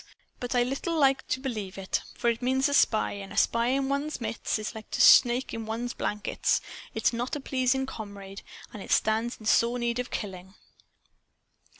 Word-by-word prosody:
But 245 0 -3
I 245 - +4
little 275 +7 -2
like 270 -3 +3
to 260 - -1
believe 215 -8 -5
it. 190 -1 -2 0.2
For 235 - +2
it 230 - -6
means 265 +2 +2
a 285 - -1
spy. 220 -5 +3
And 200 -1 -8
a - - -8
spy 235 0 +2
in 270 +1 +1
one's 280 +2 -2
midst 225 -1 -2
is 215 0 -5
like 220 -1 -10
to - - -3
a - - -6
snake 245 +1 +6
in 225 -1 -5
one's 235 +2 -3
blankets. 210 0 -1 0.4
It - - -4
is - - +4
a - - -3
not 245 +5 -2
pleasing 265 0 +1
comrade. 200 -5 -8 0.3
And 210 - -8
it - - -10
stands 225 +2 +1
in 215 - -12
sore 235 +2 +3
need 240 0 -1
of 250 - -3
killing." 190 -2 -6
235 Hz, 205 wpm, -28 LUFS, 215-260 Hz, 0.4 s, snake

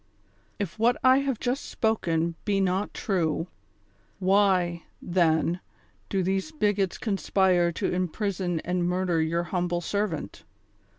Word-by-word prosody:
If 200 -1 -4
what 240 +2 +3
I 260 +1 +6
have 275 -4 -1
just 255 +3 -1
spoken 170 -7 0
be 200 -2 +1
not 190 +1 0
true, 170 -3 -1 0.7
why, 185 -3 +2
then, 170 -1 +1 0.5
do 190 -2 0
these 190 - -1
bigots 205 - 0
conspire 190 -4 +2
to - - -1
imprison 180 -1 -1
and 180 0 -1
murder 180 -2 +1
your 165 +2 0
humble 175 0 -1
servant 200 -3 -3
185 Hz, 120 wpm, -27 LUFS, 175-205 Hz, 0.7 s, I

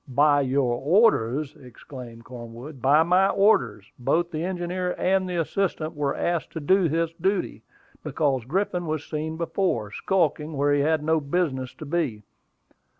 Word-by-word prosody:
"By 145 +2 +3
your 130 -2 +1
orders?" 150 - +2
exclaimed 125 -2 -11
Cornwood. 120 +3 -10
"By 145 +5 +5
my 185 +3 +3
orders. 125 - +2
Both 170 +7 0
the 155 +1 -3
engineer 180 0 -2
and 185 0 +1
the 180 - -3
assistant 165 -2 -1
were 145 -2 -1
asked 170 -2 -1
to 160 - -4
do 180 +3 +3
this 165 +1 -1
duty, 195 +1 -1 0.4
because 135 -6 0
Griffin 180 +3 -1
was 155 -1 -3
seen 160 +1 -4
before, 165 - -1
skulking 160 - 0
where 145 +1 +2
he 145 - +2
had 155 +1 +1
no 160 +1 +2
business 140 -5 -2
to 155 - -9
be." 140 -9 -2
155 Hz, 150 wpm, -25 LUFS, 135-175 Hz, 0.4 s, By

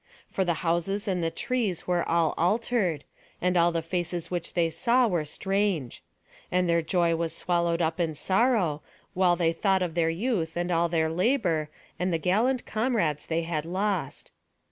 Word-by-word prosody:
For 190 - 0
the 175 -2 0
houses 185 +5 0
and 185 -3 0
the 165 - +1
trees 215 -2 -2
were 175 -1 +1
all 165 -2 +2
altered; 185 - 0 0.4
and 180 0 +1
all 170 0 +4
the 165 -1 -2
faces 175 0 -3
which 175 -2 -4
they 165 -2 +2
saw 240 +9 +3
were 175 -7 0
strange; 190 - -1 0.5
and 180 0 +2
their 170 0 +3
joy 170 0 +1
was 165 0 -2
swallowed 170 -1 +1
up 160 +2 -1
in 165 -3 0
sorrow, 190 - +1 0.3
while 180 -2 +3
they 165 -1 +1
thought 190 +2 +1
of 170 -3 -3
their 165 -1 +2
youth, 170 -3 -1
and 175 +1 -1
all 170 0 +2
their 160 -1 +1
labour, 170 - +1 0.3
and 180 +1 0
the 165 - +1
gallant 220 +10 +1
comrades 215 - 0
they 165 0 0
had 165 -2 -2
lost. 185 -3 -2
175 Hz, 175 wpm, -27 LUFS, 165-195 Hz, 0.5 s, all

